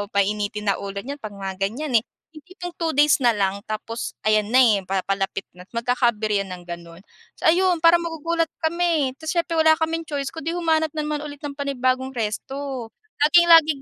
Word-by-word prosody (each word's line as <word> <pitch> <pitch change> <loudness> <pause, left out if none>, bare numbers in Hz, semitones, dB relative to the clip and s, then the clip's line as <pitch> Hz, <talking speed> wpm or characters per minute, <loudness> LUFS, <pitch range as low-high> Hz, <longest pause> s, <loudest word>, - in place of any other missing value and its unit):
painitin 205 +1 0
na - - 0
ulo 200 0 -6
niyan 280 +3 -6
'pag 215 -2 -7
mga 195 -1 -6
ganyan 245 +2 0
eh. - - -34 0.3
Yung 310 -2 -14
tipong 360 -1 -7
two 325 -2 0
days 295 0 +5
na 240 -4 +3
lang, 195 -1 0
tapos 225 +2 -5
ayan 215 -1 +2
na 235 - -2
eh, 215 -5 +4
papalapit 195 0 -1
na't 180 +1 -15
magkaka-aberya 230 -4 +1
ng 180 -1 -8
ganon. 170 0 -9 0.3
So, - - -14
ayon 355 -1 +2
parang 335 +1 +7
magugulat 330 0 -1 0.2
kami. 325 -4 +1
Tapos 320 +2 -4
siyempre, 335 -1 0
wala 315 0 +6
kaming 325 +1 -2
choice 280 -2 -3
kung 320 -2 -8
'di 330 - -1
humanap 320 -3 +1
na 305 - -1
naman 300 0 -2
ulit 290 -1 -9
ng 285 -1 -6
panibagong 260 -2 -1
resto. 255 +3 -4 0.3
Lagi-laging 325 -2 +6
275 Hz, 185 wpm, -23 LUFS, 210-320 Hz, 0.3 s, parang